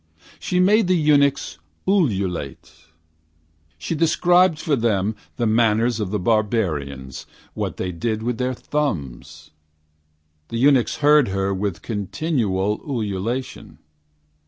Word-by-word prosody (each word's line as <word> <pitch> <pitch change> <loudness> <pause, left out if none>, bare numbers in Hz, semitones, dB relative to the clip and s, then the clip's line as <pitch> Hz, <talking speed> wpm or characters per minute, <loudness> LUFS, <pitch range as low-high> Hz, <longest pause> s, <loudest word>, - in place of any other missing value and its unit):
She 180 - -1
made 205 +2 +4
the 185 0 +3
eunuchs 145 -3 +2 0.3
ululate. 95 - -1 0.9
She 80 - -4
described 170 +2 +3
for 155 -2 0
them 110 -3 0 0.2
The 120 - 0
manners 115 +1 +2
of 105 -3 -2
the 105 - -1
barbarians 90 - -1 0.3
What - - -4
they 90 - -3
did 110 +5 -3
with 120 0 -2
their 130 0 -1
thumbs. 95 - -4 1.0
The 115 - -4
eunuchs 130 -1 +3
heard 150 -2 +6
her 95 0 -1
With 95 -2 -3
continual 105 - -1
ululation. 115 0 -4
115 Hz, 110 wpm, -22 LUFS, 95-145 Hz, 1.0 s, heard